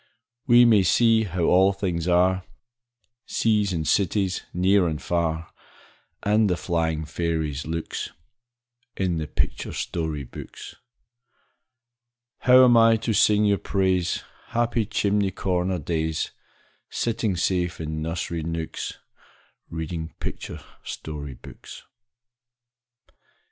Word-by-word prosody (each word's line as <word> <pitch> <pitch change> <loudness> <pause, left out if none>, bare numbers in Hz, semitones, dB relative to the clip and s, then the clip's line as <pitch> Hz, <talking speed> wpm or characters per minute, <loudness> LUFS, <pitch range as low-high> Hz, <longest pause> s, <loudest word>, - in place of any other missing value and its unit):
We 120 -1 +7
may 110 -4 +6
see 115 +3 +4
how 90 -2 -2
all 95 +3 +5
things 90 -4 -2
are, 90 +1 +3 0.8
Seas 105 -3 +1
and 80 -3 -2
cities, 95 -1 +1
near 95 +1 +3
and 80 -2 -2
far, 85 -1 -2 0.7
And 105 0 +3
the 90 - +1
flying 80 -2 -1
fairies' 80 -3 -2
looks, 80 0 -4 0.9
In 90 -3 0
the 80 - -4
picture - - -2
story 80 -4 -3
books. 60 - -10 1.7
How 130 0 +7
am 120 -1 +5
I 115 0 +6
to 115 0 -2
sing 105 0 +4
your 100 -1 +2
praise, 95 -3 0 0.2
Happy 115 -2 0
chimney 100 -2 +1
corner 90 -1 -1
days, 80 0 -2 0.6
Sitting 115 -4 -1
safe 90 0 0
in 80 -1 -4
nursery 85 +1 -3
nooks, 80 0 -4 0.7
Reading 80 0 -5
picture - - -6 0.2
story 75 -3 -6
books? - - -12
90 Hz, 110 wpm, -24 LUFS, 80-105 Hz, 1.7 s, We